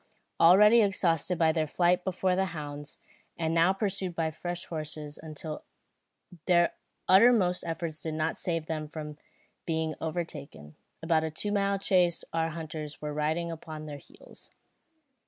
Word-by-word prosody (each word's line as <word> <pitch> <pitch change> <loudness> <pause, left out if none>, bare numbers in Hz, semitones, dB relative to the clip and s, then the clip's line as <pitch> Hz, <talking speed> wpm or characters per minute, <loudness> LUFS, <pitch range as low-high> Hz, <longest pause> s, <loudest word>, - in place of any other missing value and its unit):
Already 210 +7 +7
exhausted 180 -4 +1
by 160 -1 +4
their 155 -1 0
flight 180 +3 +2
before 185 0 0
the 190 +1 +1
hounds, 145 0 -7 0.4
and 160 -1 -1
now 165 +2 +4
pursued 195 -3 -2
by 160 -1 0
fresh 175 +2 -5
horses, 155 -2 -6 1.3
their 175 -2 +4 0.3
utmost 190 -3 +5
efforts 165 -2 -4
did 160 0 -3
not 155 +1 -1
save 165 -3 -2
them 155 -1 -3
from 150 -1 -8 0.5
being 160 -1 -1
overtaken; 155 - -5 0.3
after 160 -1 +3
a - - -3
two 205 +7 -3
mile 200 -1 +1
chase 180 -3 +2
our 165 0 +1
hunters 155 -2 -6
were 150 -1 -4
riding 160 +3 -1
upon 155 -1 -8
their 145 -1 -7
heels. - - -17
165 Hz, 140 wpm, -29 LUFS, 155-180 Hz, 1.3 s, Already